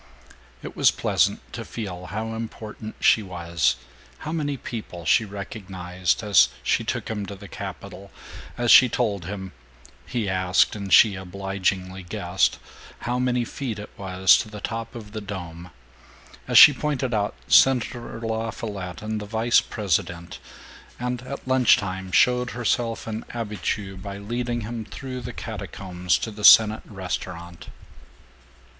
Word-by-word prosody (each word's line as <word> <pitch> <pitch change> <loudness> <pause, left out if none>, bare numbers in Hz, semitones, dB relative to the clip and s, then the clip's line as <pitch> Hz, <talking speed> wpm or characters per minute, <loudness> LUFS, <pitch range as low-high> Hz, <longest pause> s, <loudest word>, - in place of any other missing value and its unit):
It - - -8
was - - +5
pleasant - - 0
to - - -5
feel 90 -5 -6
how 110 +2 -4
important 110 -1 -7
she 110 - +5
was, 85 - 0 0.4
how 155 - -6
many 145 -4 -2
people 105 -9 -7
she 110 - +4
recognized, 95 -3 -3
as 100 -10 +5
she - - +1
took - - -3
him 105 -2 -3
to 100 - -7
the 100 +1 -11
Capitol, 100 0 -8 0.5
as 120 -1 +2
she 125 - +9
told 100 -5 -1
him 95 0 -6 0.6
(he 115 -4 -2
asked 95 0 +2
and 100 -2 -6
she 110 -3 +7
obligingly 95 0 -3
guessed) 90 +1 0 0.4
how 125 +1 -1
many 125 -1 +1
feet 120 -3 -5
it 105 - -9
was 95 -1 +4
to 110 - -4
the 105 -1 -8
top 115 +3 -5
of 105 -3 -9
the 110 0 -5
dome, 90 -4 -7 0.8
as - - +3
she 145 - +11
pointed 140 -3 -2
out 105 - 0
Senator 120 -3 +3
LaFollette 110 -4 -4
and 110 0 -3
the 105 - -7
vice 115 +2 +3
president, 85 -4 -2 0.6
and 125 0 -3
at - - -7
lunch 130 -1 +5
time 95 -4 -5
showed 125 +4 +3
herself 120 -1 -1
an 110 0 -4
habitue 105 -3 -4
by 100 +1 -7
leading 120 +3 -3
him 115 +1 -5
through 130 +4 -7
the 125 +1 -6
catacombs 90 -5 -3
to 110 - -4
the 105 0 -9
senate 110 +1 +8
restaurant. 90 -3 -6
105 Hz, 145 wpm, -24 LUFS, 95-115 Hz, 0.8 s, she